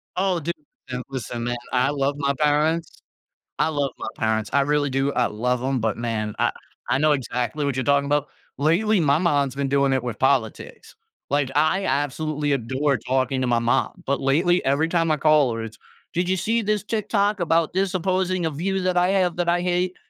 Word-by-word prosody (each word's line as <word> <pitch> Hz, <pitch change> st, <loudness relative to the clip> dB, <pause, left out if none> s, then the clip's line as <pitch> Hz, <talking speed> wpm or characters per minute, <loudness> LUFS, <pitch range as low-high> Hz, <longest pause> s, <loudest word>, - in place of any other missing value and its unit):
Oh, 185 Hz, -1 st, +1 dB
dude, 165 Hz, +2 st, -3 dB, 0.4 s
listen 125 Hz, 0 st, -4 dB
listen 120 Hz, -2 st, -5 dB
man, 120 Hz, -, -1 dB, 0.2 s
I 125 Hz, +1 st, +2 dB
love 140 Hz, 0 st, 0 dB
my 140 Hz, -1 st, 0 dB
parents 155 Hz, +3 st, 0 dB, 0.6 s
I -, -, +2 dB
love 145 Hz, -3 st, -1 dB
my -, -, -5 dB
parents, 110 Hz, -1 st, -1 dB
I 140 Hz, -, +4 dB
really 145 Hz, 0 st, +1 dB
do, 135 Hz, +2 st, 0 dB
I 125 Hz, -, +1 dB
love 125 Hz, +4 st, -1 dB
'em, 130 Hz, -1 st, 0 dB
but 110 Hz, -1 st, -1 dB
man, 110 Hz, -3 st, -3 dB
I -, -, +2 dB, 0.4 s
I 135 Hz, -, +2 dB
know 155 Hz, +1 st, +3 dB
exactly 125 Hz, +1 st, -2 dB
what 140 Hz, -3 st, -1 dB
you're 130 Hz, -, -1 dB
talking 140 Hz, +1 st, +2 dB
about. 145 Hz, 0 st, 0 dB, 0.3 s
Lately, 185 Hz, +8 st, +2 dB
my 145 Hz, -2 st, +3 dB
mom's 145 Hz, -6 st, +1 dB
been 140 Hz, 0 st, -2 dB
doing 140 Hz, 0 st, +2 dB
it 130 Hz, -2 st, +1 dB
with 115 Hz, -4 st, -4 dB
politics, 130 Hz, -4 st, -1 dB, 0.4 s
like, 140 Hz, -2 st, +1 dB
I 155 Hz, +6 st, +2 dB
absolutely 145 Hz, 0 st, -1 dB
adore 135 Hz, +1 st, 0 dB
talking 130 Hz, +1 st, -1 dB
to 130 Hz, -, 0 dB
my 120 Hz, -1 st, +2 dB
mom, 120 Hz, 0 st, 0 dB
but 140 Hz, +1 st, 0 dB
lately, 170 Hz, +7 st, +2 dB
every 140 Hz, +4 st, +2 dB
time 165 Hz, -1 st, +1 dB
I 155 Hz, -, +3 dB
call 150 Hz, -4 st, +3 dB
her 115 Hz, -, -4 dB
it's, 110 Hz, -1 st, -10 dB, 0.3 s
"Did 175 Hz, +1 st, -1 dB
you 190 Hz, -, +2 dB
see 225 Hz, +5 st, 0 dB
'this' 210 Hz, 0 st, -1 dB
TikTok 210 Hz, -1 st, 0 dB
about 165 Hz, -1 st, +1 dB
'this' 190 Hz, 0 st, 0 dB
opposing, 185 Hz, -1 st, 0 dB
uh, -, -, 0 dB
view 190 Hz, +6 st, -2 dB
that 180 Hz, -1 st, 0 dB
I 180 Hz, +1 st, +3 dB
have 185 Hz, -3 st, +1 dB
that 175 Hz, -1 st, -1 dB
I 175 Hz, 0 st, +2 dB
hate?" 180 Hz, +1 st, 0 dB
145 Hz, 205 wpm, -23 LUFS, 130-175 Hz, 0.6 s, I